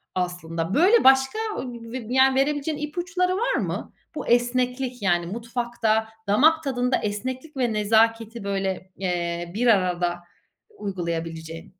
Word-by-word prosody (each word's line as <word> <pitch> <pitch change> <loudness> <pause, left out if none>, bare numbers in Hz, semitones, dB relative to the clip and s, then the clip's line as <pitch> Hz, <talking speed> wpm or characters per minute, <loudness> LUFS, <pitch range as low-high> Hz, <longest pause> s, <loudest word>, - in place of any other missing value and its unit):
aslında. 175 -1 -3
Böyle 385 +10 +5
başka 265 +9 +5 0.2
b 235 -1 -7
b - - -3
yani 265 0 +5
ve 270 - +4
verebileceğin 295 +1 -1
ipuçları 360 +5 -1
var 475 - 0
mı? - - -3 0.2
Bu - - -5
esneklik, 250 0 +1
yani 175 -3 +2
mutfakta, 230 +1 -1 0.2
damak 315 +10 +4
tadında 250 -2 0
esneklik 255 +8 -4
ve 240 -4 +1
nezaketi 225 +1 +2
böyle, 195 -1 -3
eee, 175 -2 -2
bir 245 +2 +1
arada 180 -4 +2 0.6
uygulayabileceğin. 165 -4 -5
230 Hz, 125 wpm, -24 LUFS, 185-265 Hz, 0.6 s, Böyle